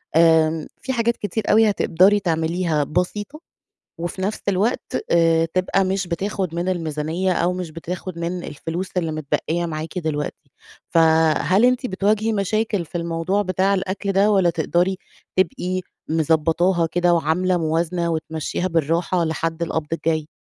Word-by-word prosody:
آمم 160 -1 +4
في 265 - -2
حاجات 235 -1 +1
كتير 210 +2 -3
أوي 220 0 +5
هتقدري 195 +1 +3
تعمليها 165 -2 0
بسيطة 200 - -3 0.6
وفي 175 +3 -4
نَفْس 205 +3 -2
الوقت 200 +5 0
آآ 165 -1 +4
تبقى 185 +1 +2
مش 190 0 -1
بتاخُد 185 0 -2
من 175 +2 -2
الميزانيّة 165 +1 -1
أو 175 0 +1
مش 180 -3 -5
بتاخُد 170 +2 -6
من 175 +1 -3
الفلوس 165 +5 -5
اللي 165 -3 0
متبقّية 155 +3 -1
معاكِ 160 +2 -5
دلوقتي. 150 -3 -4 0.4
فهل 160 +5 +4
أنتِ 255 +1 +3
بتواجهي 210 +2 +1
مشاكل 210 -1 0
في 170 +2 -5
الموضوع 170 +4 -1
بتاع 190 +1 +1
الأكل 195 +1 -2
ده 200 +2 +4
والّا 190 -4 +4
تقدري 175 +3 0 0.4
تبقي 185 0 0 0.3
مضبّطاها 165 +3 +2
كده 175 +1 +2
وعاملة 170 +3 +1
موازنة 170 +2 0
وتمشّيها 160 +2 -2
بالراحة 170 +2 +1
لحد 165 +1 -2
القبض 160 -2 -2
الجاي؟ 160 -2 -1
175 Hz, 140 wpm, -22 LUFS, 160-190 Hz, 0.6 s, أوي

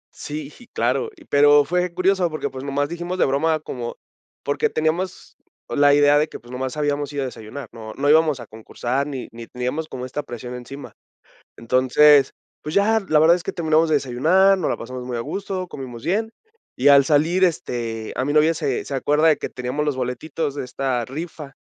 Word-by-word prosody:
Sí, 150 -1 -6 0.2
claro. 455 - 0
Y - - -18
pero 145 0 +5
fue 180 +2 0
curioso, 185 0 +1
porque, 155 -1 -4
pues, 130 0 -7
nomás 140 +1 -1
dijimos 175 +3 -5
de - - +3
broma 155 +4 +1
como 120 -5 -6 0.5
porque 145 - 0
teníamos 165 +4 -2 0.3
la 145 0 +4
idea 145 0 +5
de 155 - +1
que, - - -9
pues, 120 +2 -16
nomás 130 +2 -4
habíamos 145 -1 -1
ido 140 -1 -2
a - - -2
desayunar. 125 +2 -8
No 110 -2 -9
no 145 +1 0
íbamos 155 -3 +4
a 120 - -8
concursar 120 +5 -3
ni 135 -4 -5
ni 115 0 -10
teníamos 125 +6 -3
como 125 -3 -6
esta 130 +3 -4
presión 125 -1 -8
encima. 130 +3 -9 0.6
Entonces, 130 +4 +4 0.3
pues, 150 - -5
ya, 220 +3 +3
la 155 - +4
verdad 160 +3 +6
es 175 - -4
que - - -3
terminamos 160 -1 +2
de 155 - +2
desayunar, 160 +9 +3
nos 175 - -1
la - - -1
pasamos 125 +1 -7
muy 125 -1 -4
a 115 - -2
gusto, 190 +5 -4
comimos 125 -6 -8
bien. 220 +5 0 0.5
Y 135 - +3
al 140 -1 +7
salir, 160 +5 +2
este, 115 -9 -2
a 130 - -1
mí 145 - -1
novia, 155 +2 +5
se 140 -5 -2
se 140 - -6
acuerda 150 +4 +2
de 155 - +4
que - - -4
teníamos 130 +4 -3
los 145 -3 -1
boletitos 130 +4 -3
de 145 - -4
esta 125 -3 -2
rifa, 150 0 -7
145 Hz, 200 wpm, -22 LUFS, 125-160 Hz, 0.6 s, al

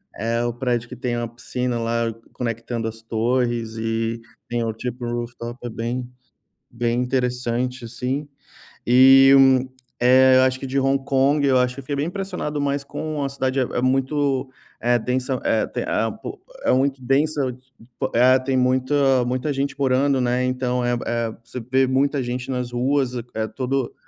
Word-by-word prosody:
eh, 115 +2 -1
o 120 - -1
prédio 120 -1 -1
que 125 - -9
tem 120 -1 -2
uma 120 0 -2
piscina, 120 +1 -3
lá, 115 0 -1 0.2
conectando 115 -1 -3
as 115 0 -7
torres 115 0 -1
e 115 +1 -2 0.3
tem 120 -1 -1
o, 115 - -1
tipo, 120 +2 -5
rooftop. 120 0 -5
É - - -3
bem 120 +2 -4 0.6
bem 120 0 -1
interessante, 125 -1 -1
assim. 125 +5 -3 0.6
E, 135 +2 +7
hum, 130 -1 +5 0.3
eh, 130 +1 +6
eu 130 - +6
acho 130 0 +2
que 135 - -6
de 135 +1 0
Hong 135 0 +1
Kong, 140 +2 +2
eu 130 -2 +4
acho 125 0 +1
que 140 - -7
eu - - -11
fiquei 145 +2 -3
bem 145 +2 -1
impressionado 180 -5 -4
mais 140 0 0
com 155 +1 -4
a 140 - 0
cidade. 135 -1 -1
É - - +3
é 120 0 -2
muito 135 +1 0 0.3
é 120 +1 +2
densa 125 +2 -1
eh, - - +2
tem - - -4
a, - - 0
eh, - - -14
po - - -7 0.2
é - - +3
muito 135 0 +1
densa 145 +4 +1 0.7
é, 130 +2 +6
tem 130 0 -1
muita 130 +1 +2
muita 130 +4 -1
gente 140 +1 -2
morando, 135 0 +2
né? 125 0 +1
Então, 125 -1 -1
eh 120 0 +1
eh, 115 -1 -1
você 115 +2 -7
vê 130 +3 +2
muita 135 +2 +1
gente 125 +2 -4
nas 125 -1 -2
ruas. 130 +1 +1 0.2
É 110 0 -1
todo 130 0 -2
125 Hz, 180 wpm, -22 LUFS, 120-135 Hz, 0.7 s, E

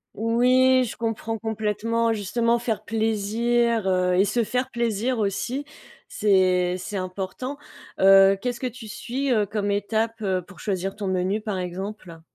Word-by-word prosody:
Oui, 255 +4 +4
je 235 - -5
comprends 225 -1 -3
complètement. 225 +1 -1
Justement 230 +3 0
faire 225 -2 -2
plaisir, 225 0 +1
heu 180 -1 +2
et 190 +2 +4
se 230 +4 +1
faire 250 +3 -2
plaisir 235 0 -1
aussi, 230 +7 -2 0.4
c'est 185 -3 +2
c'est 195 +2 -5
important. 190 +9 -5 0.4
Heu, 195 0 +7
qu'est-ce 245 +2 -3
que 255 - -2
tu 240 -2 -9
suis, 260 +5 -3
heu, 210 -3 +2
comme 205 0 -2
étape, 220 +3 -1
heu, 190 -3 -1
pour 190 +2 -16
choisir 195 -1 -3
ton 205 -2 -4
menu, 190 +3 0
par 210 -3 -3
exemple? 180 -1 -6
215 Hz, 150 wpm, -24 LUFS, 195-235 Hz, 0.4 s, Heu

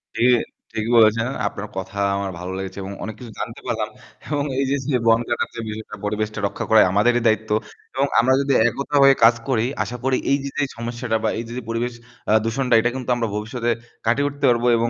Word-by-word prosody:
জি, - - 0 0.5
ঠিকই 110 +1 -3
বলেছেন। 115 +1 +5 0.2
আপনার 105 +1 -6
কথা 95 +1 -5 0.2
আমার 100 -1 -2
ভালো 90 +1 -5
লেগেছে 95 0 -6
এবং 95 +1 -6
অনেক 110 0 -5
কিছু 120 -3 -9
জানতে 115 - -5
পারলাম 110 -2 -1 0.4
এবং 145 -2 0
এইযে 135 0 +1 0.2
যে 130 - +3
বন 115 0 +6
কাটার 120 - -1
যে 115 - -5
বিষয়টা 110 0 -6
পরিবেশটা 105 +1 -2
রক্ষা - - -5
করাই 110 -1 +7
আমাদেরই 120 +5 +3
দায়িত্ব 110 0 +1 0.4
এবং 135 +1 +2
আমরা 125 +3 +4
যদি 140 -1 +1 0.2
একতা 140 +5 -4
হয়ে 135 0 +7
কাজ 115 +1 +7
করি 120 -3 +2 0.2
আশা 120 +4 -6
করি 130 -1 +2
এইযে 140 0 0
যে 145 - +2
সমস্যাটা 115 0 -2
বা - - +2
এইযে 115 0 -7
যে 125 - -5
পরিবেশ 120 +1 -1 0.4
আ - - +5
দূষণটা 125 +2 0
এটা 120 - +2
কিন্তু 130 -1 -5
আমরা 115 -1 -1
ভবিষ্যতে 115 +3 -2 0.4
কাটিয়ে 140 +6 +2
উঠতে 140 0 -3
পারবো 120 0 +2
এবং 115 +1 +1
115 Hz, 205 wpm, -22 LUFS, 110-125 Hz, 0.5 s, করাই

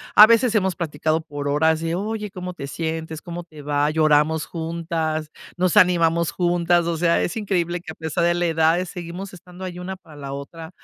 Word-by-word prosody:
a 215 - +11
veces 230 +1 +4
hemos 190 -5 +1
platicado 160 -1 -1
por 145 -3 -6
horas 160 +2 +2
de 165 +1 -2
oye, 210 +2 -3
¿cómo 180 -1 -6
te 140 -5 -7
sientes, 160 +1 -4
cómo 175 0 -6
te 155 -3 -13
va? 145 0 +1
Lloramos 155 0 +3
juntas, 160 -2 -3 0.3
nos 180 -1 +1
animamos 170 -3 +4
juntas. 175 -1 +2
O 170 0 -1
sea, 170 +1 +3
es - - -2
increíble 180 -5 -1
que 170 - -8
a - - -11
pesar 160 +2 -2
de 175 - +3
la 175 0 0
edad 165 +2 +2
seguimos 180 +2 -7
estando 180 +1 -12
ahí 180 -1 -6
una 185 +1 -5
para 165 -5 -17
la 140 -1 -6
otra, 160 +4 -8
170 Hz, 200 wpm, -22 LUFS, 160-180 Hz, 0.3 s, a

